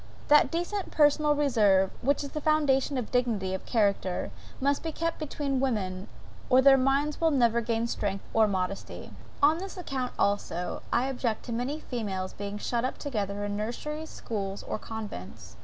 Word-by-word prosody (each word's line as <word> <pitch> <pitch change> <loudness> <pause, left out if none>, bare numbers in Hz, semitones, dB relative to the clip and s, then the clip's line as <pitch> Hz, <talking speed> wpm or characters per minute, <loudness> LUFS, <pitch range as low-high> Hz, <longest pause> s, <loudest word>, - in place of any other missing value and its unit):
That 295 0 +6
decent 350 +4 -2
personal 295 0 +4
reserve, 210 -10 +3
which 280 +3 +1
is 280 - -6
the 305 - -4
foundation 290 -3 +2
of 245 -4 -3
dignity 225 -7 0
of 190 - -5
character, 200 -5 +1 0.3
must 280 +1 +1
be 325 - -3
kept 330 +1 -2
up 305 - -3
between 275 -3 -1
women, 200 -7 -1 0.4
or 255 - +6
their 270 +1 +8
minds 275 +4 +1
will 325 - +5
never 235 -5 +3
gain 230 0 0
strength 200 -4 -2
or 220 -1 +5
modesty. 190 -1 -3 0.3
On 310 +3 +5
this 385 +1 -7
account 265 -8 -3
also, 180 -3 -1
I 240 - +2
object 245 -4 -2
to 240 - -6
many 255 +6 -2
females 200 -9 -4
being 205 0 -5
shut 235 +3 -1
up 255 - -2
together 205 -7 -3
in 205 0 -3
nurseries, 300 +9 -4
schools, 200 -3 -4
or - - -4
convents. 210 - -8
245 Hz, 175 wpm, -28 LUFS, 205-290 Hz, 0.4 s, their